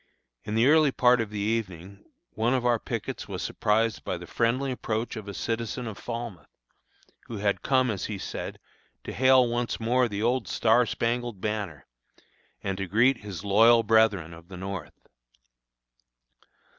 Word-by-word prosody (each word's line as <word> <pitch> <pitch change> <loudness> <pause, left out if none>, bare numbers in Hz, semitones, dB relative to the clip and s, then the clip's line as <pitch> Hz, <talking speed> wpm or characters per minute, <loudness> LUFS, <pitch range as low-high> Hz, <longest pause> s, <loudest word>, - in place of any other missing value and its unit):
In 105 - -3
the 115 +2 +4
early 150 0 +5
part 125 -2 +4
of 110 - -3
the 105 - -6
evening 100 -3 -3 0.3
one 115 +4 +1
of 125 -1 -1
our 120 -2 +3
pickets - - -5
was - - -5
surprised 105 -4 0
by - - -3
the - - -9
friendly 130 +4 0
approach 115 -2 -3
of 110 -2 -7
a 100 - -5
citizen 115 +2 -3
of 110 -3 -5
Falmouth, 115 -8 -6 0.8
who 115 - -6
had 100 0 0
come, 130 -3 +2
as 100 - -3
he 105 - -4
said, - - -6 0.5
"to - - -6
hail 130 -1 +5
once 120 0 -2
more 120 +2 +2
the 105 -1 -4
'old 120 -2 +1
star 115 +4 +3
spangled 120 -2 -2
banner,' 100 -9 -4 0.8
and 95 -1 -3
to 95 - -3
greet 120 +8 +3
his 100 -3 -7
loyal 115 +3 +6
brethren 105 -7 +3
of 85 +1 -14
the 95 -1 -10
North." 95 -2 -7
110 Hz, 165 wpm, -27 LUFS, 100-120 Hz, 0.8 s, loyal